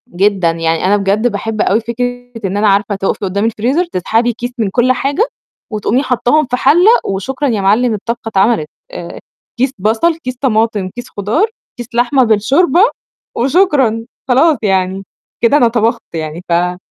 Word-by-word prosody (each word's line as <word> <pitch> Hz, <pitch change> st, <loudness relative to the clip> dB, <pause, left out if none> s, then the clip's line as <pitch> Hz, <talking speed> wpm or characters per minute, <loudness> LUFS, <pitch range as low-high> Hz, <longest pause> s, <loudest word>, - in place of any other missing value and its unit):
جدًا، 190 Hz, -2 st, +1 dB
يعني 165 Hz, 0 st, -1 dB
أنا 200 Hz, +2 st, +3 dB
بجد 205 Hz, +4 st, +1 dB
باحب 215 Hz, 0 st, -3 dB
أوي 205 Hz, +4 st, +2 dB
فكرة 245 Hz, +1 st, -4 dB
إن 195 Hz, +1 st, -2 dB
أنا 210 Hz, +1 st, +2 dB
عارفة 200 Hz, +1 st, +2 dB
تُقَفي 195 Hz, 0 st, -2 dB
قُدّام 200 Hz, +3 st, -1 dB
الفريزر 245 Hz, +10 st, 0 dB
تسحبي 235 Hz, -, 0 dB
كيس 245 Hz, +2 st, -5 dB
من 220 Hz, -4 st, 0 dB
كل 245 Hz, +5 st, +2 dB
حاجة 280 Hz, -, 0 dB, 0.4 s
وتقومي 215 Hz, +5 st, 0 dB
حاطّاهم 260 Hz, +4 st, +1 dB
في 250 Hz, -, -2 dB
حَلَّة 345 Hz, -, +5 dB
وشكرًا 255 Hz, +9 st, -2 dB
يا 220 Hz, -6 st, 0 dB
معلِّم، 220 Hz, +5 st, +2 dB
الطبخة 230 Hz, +3 st, -4 dB
اتعملت. 200 Hz, -5 st, +1 dB, 0.2 s
آآ 170 Hz, -, -8 dB, 0.4 s
كيس 260 Hz, +2 st, 0 dB
بصل، 225 Hz, -, +1 dB
كيس 255 Hz, -6 st, -6 dB
طماطم، 220 Hz, -6 st, 0 dB
كيس 245 Hz, +6 st, -9 dB
خضار، 215 Hz, -, 0 dB, 0.3 s
كيس 240 Hz, -2 st, -7 dB
لحمة 250 Hz, +3 st, +3 dB
بالشوربة، 260 Hz, -, +3 dB, 0.5 s
وشكرًا 265 Hz, -, +2 dB, 0.2 s
خلاص 275 Hz, +4 st, +4 dB
يعني، 190 Hz, -1 st, 0 dB, 0.4 s
كده 240 Hz, +5 st, +4 dB
أنا 245 Hz, -, +4 dB
طبخت 230 Hz, 0 st, 0 dB
يعني. 160 Hz, +1 st, -5 dB
ف -, -, -3 dB
آه، 180 Hz, +1 st, +1 dB
230 Hz, 165 wpm, -14 LUFS, 200-255 Hz, 0.5 s, حَلَّة